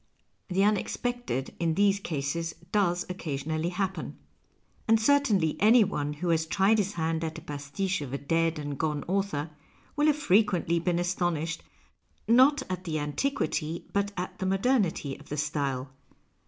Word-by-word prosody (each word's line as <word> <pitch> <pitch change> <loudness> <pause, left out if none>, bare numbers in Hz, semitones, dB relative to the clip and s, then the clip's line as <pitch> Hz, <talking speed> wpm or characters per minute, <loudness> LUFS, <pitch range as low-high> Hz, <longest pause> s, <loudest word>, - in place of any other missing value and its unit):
The 190 0 0
unex 205 -1 +1
pected 245 - -2
in 165 -2 +1
these 200 0 +3
cases 165 -1 -3 0.2
docs 180 -4 +1
occasionally 155 -2 -3
happen. 185 -2 -3 0.7
And 225 0 +5
certainly 220 - +3
any 225 +3 +6
one 150 -7 -2
who 170 +4 -3
has 160 -1 +2
tried 200 +5 +3
his 205 0 -1
hand 165 -1 -1
at 160 0 -4
a - - -8
jmsiiche 150 +5 -3
of 140 -3 -6
a 140 - -2
dead 165 +3 0
and 145 -2 -5
gone 150 -2 -1
author 175 -5 -1 0.4
will 295 +1 +3
have 300 -1 +3
frequently 195 - +2
been 170 0 0
astonished, 175 -2 -1 0.7
not 260 +6 +5
at 185 0 -4
the 160 -3 -2
antiquity 160 - -2
but 200 0 0
at 180 +1 -5
tiie 190 - -1
modernity 195 - +1
of 150 - -16
the 150 - -3
style. 140 -3 -2
175 Hz, 155 wpm, -28 LUFS, 155-200 Hz, 0.7 s, any